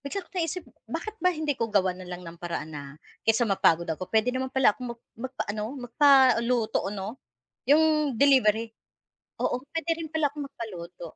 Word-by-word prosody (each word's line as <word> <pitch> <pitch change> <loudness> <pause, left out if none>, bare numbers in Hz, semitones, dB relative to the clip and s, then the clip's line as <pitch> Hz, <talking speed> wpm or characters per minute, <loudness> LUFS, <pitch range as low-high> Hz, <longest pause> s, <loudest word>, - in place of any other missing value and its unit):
Bigla 360 +7 -4
ko - - -28
naisip 355 0 -2 0.2
bakit 430 - -4
ba 365 - +5
hindi 310 -4 -1
ko 230 -3 -2
gawan 185 -3 +1
na 180 - -10
lang 180 0 -7
ng 165 0 -9
paraan 170 -2 -4
na, 145 -1 -6 0.4
kaysa 225 +2 +3
mapagod 170 -5 +3
ako 165 +3 -4
puwede 225 +3 +2
naman 260 0 -2
pala 265 -5 +4
akong 240 0 -7
mag - - -40
magpa-ano 220 -4 -4
magpaluto 250 -4 +3
'no? 205 +5 -6 0.5
'Yong 305 -3 +4
delivery, 230 -5 +4 0.7
oo - - +1
puwede 325 +3 -5
rin 325 -2 -7
pala 315 -2 +2
akong 290 +1 -6
magpaluto. 175 -6 -8
240 Hz, 170 wpm, -27 LUFS, 200-285 Hz, 0.7 s, ba